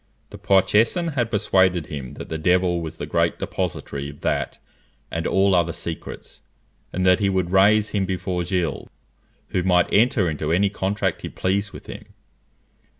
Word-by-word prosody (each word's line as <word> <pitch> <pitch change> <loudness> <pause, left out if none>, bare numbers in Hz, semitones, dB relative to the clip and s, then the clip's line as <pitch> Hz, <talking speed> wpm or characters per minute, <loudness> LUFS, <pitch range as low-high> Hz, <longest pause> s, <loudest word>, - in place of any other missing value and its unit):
The - - -10
Poitousan 105 - +3
had 120 -4 0
persuaded 95 -5 +2
him 70 -4 -7
that - - -8
the 80 - -4
devil 90 +1 +2
was 80 -1 -6
the - - -4
great - - 0
depository 70 0 -4
of 70 0 -13
that - - -1 0.5
and 80 0 -2
all 95 0 +3
other 85 -2 +2
secrets, 85 -1 -7 0.5
and 95 +1 -1
that 90 +2 +5
he 100 -2 +2
would 95 -2 0
raise 105 +3 +4
him 100 -2 -1
before 90 -1 -2
Gilles, 85 -4 -2 0.6
who 90 - 0
might 90 -1 +2
enter 110 -3 +3
into 80 -1 -2
any 95 +4 +2
contract 95 -2 -1
he - - -5
pleased 100 +2 -1
with - - -11
him. - - -9
95 Hz, 165 wpm, -23 LUFS, 85-100 Hz, 0.6 s, that